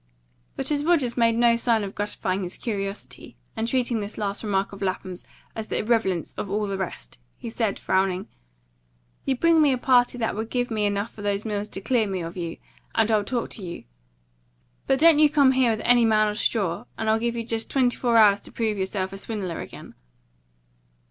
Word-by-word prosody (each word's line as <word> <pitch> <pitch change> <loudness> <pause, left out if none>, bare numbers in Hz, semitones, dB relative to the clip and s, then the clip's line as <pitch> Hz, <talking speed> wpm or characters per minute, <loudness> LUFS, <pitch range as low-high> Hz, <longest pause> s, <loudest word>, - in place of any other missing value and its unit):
But - - -2
as 290 -1 +1
Rogers 300 -8 +2
made 230 -2 +3
no 235 0 +4
sign 230 -2 +1
of 195 0 -5
gratifying 200 -2 -2
his 180 -1 -4
curiosity, 200 -3 -5 0.2
and 225 0 -2
treated 245 -2 0
this 205 +1 -6
last 200 0 -3
remark 200 -2 -1
of 200 - -10
Lapham's 185 -1 -3 0.3
as 220 -1 -5
of - - -28
the - - -1
irrelevance 215 -6 0
of 200 - -4
all 210 +2 0
the 200 -1 -3
rest, 115 - -6 0.2
he 230 - -7
said, 220 -3 -1
frowning, 190 0 0 1.0
"You 270 - +1
bring 330 +4 +4
me 295 -2 +5
a 255 - +1
party 245 -1 +3
that 225 -2 -1
will 220 +2 -3
give 245 +1 -2
me 210 -2 +1
enough 205 +2 -2
for 210 - -11
those 205 +1 -1
mills 210 -1 -2
to 195 - -7
clear 220 +1 +1
me 190 -2 -3
of 165 +1 -7
you, 170 -2 -5 0.4
and 225 0 +3
I'll 215 -1 +3
talk 240 +3 -3
to 205 - -5
you. 170 -1 -7 1.0
But 270 - +3
don't 320 +1 +6
you 305 -1 +6
come 285 -3 +5
here 260 -2 +3
with 220 -1 -2
any 245 -1 +5
man 215 -1 +3
of 210 0 -4
straw. 200 -1 0
And 220 - -3
I'll 220 0 +3
give 235 +1 -1
you 230 - -2
just 225 0 -2
twenty 255 -3 +2
four 235 -2 +2
hours 205 -2 +6
to - - -10
prove 220 -3 -1
yourself 190 0 -2
a 195 - -5
swindler 195 -6 -4
again." - - -10
220 Hz, 215 wpm, -25 LUFS, 200-240 Hz, 1.0 s, don't